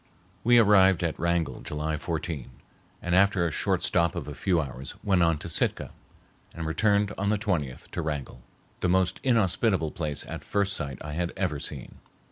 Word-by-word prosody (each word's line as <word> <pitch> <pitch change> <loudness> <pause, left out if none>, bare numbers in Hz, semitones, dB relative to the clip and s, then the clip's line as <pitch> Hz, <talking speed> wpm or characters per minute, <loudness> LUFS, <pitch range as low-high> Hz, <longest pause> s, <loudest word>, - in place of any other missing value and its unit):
] 95 0 -33
We 120 +1 +5
arrived 95 -5 +5
at 85 -2 -2
Wrangell 85 0 0
July 75 +1 -3
14, 80 -4 -4 0.5
and 90 - -1
after 95 -2 +4
a 85 - 0
short - - 0
stop 85 0 +2
of - - -5
a - - -5
few 90 -3 +1
hours 70 -2 -5
went 95 -3 +2
on 85 -2 +3
to - - -6
Sitka - - +1 0.6
and 85 - -4
returned 100 +5 +2
on 100 +1 0
the 105 - +2
20th 80 - -2
to - - -3
Wrangell, 75 -5 -4 0.4
the 90 - 0
most 95 0 +2
inhospitable 100 - +2
place 75 -4 -4
at - - -6
first 100 -1 0
sight 70 -3 -4
I 75 - -5
had 85 +2 -2
ever 90 -7 -1
seen. - - -7
85 Hz, 185 wpm, -27 LUFS, 75-100 Hz, 0.6 s, We